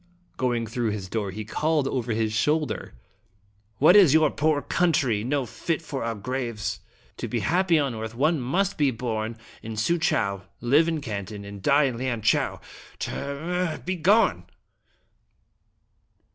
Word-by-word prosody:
" - - -37
Going 120 -2 0
through 115 +1 -2
his 105 -3 -4
door, 105 0 -2
he 105 +3 -6
called 150 +5 0
over 125 -3 -2
his 110 -1 0
shoulder: 150 - 0 0.4
" 100 +2 -39
What 160 +7 +6
is 180 -8 +7
your 155 -2 +4
poor 155 -1 +1
country? 150 -12 +1
Not 135 +1 -1
fit 165 - -2
for 150 -6 -5
our 115 0 -2
graves! 115 -1 -3 0.4
To - - -4
be - - -2
happy 175 -1 +2
on 140 -4 0
earth 110 0 -6
one 155 +5 +2
must 175 +11 0
be 145 -2 +4
born 115 -2 -3 0.2
in 110 - -6
Suchow, 110 - +1 0.2
live 140 +7 +3
in 160 -2 -1
Canton, 100 -3 -5
and 100 -1 -9
die 140 +9 +4
in 125 -4 -1
Lianchau. 120 -4 0 0.4
T - - -4
r 140 0 -4
r 165 +5 -4 0.2
r! - - -6
Begone!" 185 +5 +2
125 Hz, 160 wpm, -25 LUFS, 110-155 Hz, 0.4 s, is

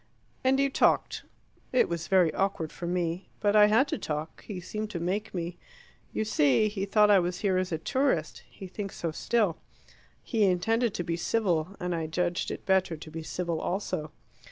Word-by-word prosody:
"And 265 +1 +3
you 275 0 +2
talked." - - +2 0.5
"It 255 - +4
was 170 -1 -4
very 185 -4 +4
awkward 190 -5 -1
for 175 - -6
me. 175 0 -2
But 205 0 +2
I 210 -1 +8
had 225 +7 +4
to - - -2
talk: 155 -2 -5
he 200 -4 -5
seemed 215 +4 -5
to 180 - -4
make 195 +6 -2
me. 175 -1 -4 0.5
You 220 - -1
see 210 - +3
he 200 -2 -3
thought 210 +1 +4
I 200 - +7
was 175 0 -2
here 190 -3 +2
as 185 0 -2
a 160 - 0
tourist; 165 - 0
he 190 - -10
thinks 195 +1 -6
so 165 - -2
still. 205 0 +1 0.7
He 225 -3 +1
intended 220 +5 +1
to 175 - -2
be 170 0 -2
civil, 180 -3 0
and 180 0 -2
I 165 -2 -2
judged 175 +2 -1
it - - -6
better 190 -4 +2
to 155 0 -11
be 165 +1 -5
civil 170 0 -3
also." 165 -5 -3
180 Hz, 195 wpm, -28 LUFS, 170-210 Hz, 0.7 s, I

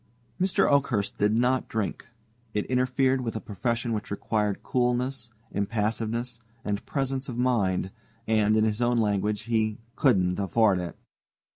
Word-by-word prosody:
Mr. 185 0 +3
Oakhurst 125 -8 +1
did 105 +1 +3
not 125 +3 +1
drink. 110 -3 -3 0.5
It 105 - 0
interfered 130 +1 +2
with 115 -3 -3
a - - -1
profession 115 +3 -2
which 105 -1 -3
required 105 0 -1
coolness, 125 0 0 0.2
impassiveness, 115 +3 -1 0.3
and 100 -1 -2
presence 135 -1 -2
of 120 - -5
mind, 100 -7 +1 0.4
and, 110 -1 +3
in 110 - +4
his 110 +1 0
own 120 0 +2
language, 105 -1 +1
he 110 -2 0 0.2
"couldn't 95 -9 +3
afford 100 0 +3
it." 85 -3 -5
115 Hz, 140 wpm, -27 LUFS, 105-125 Hz, 0.5 s, in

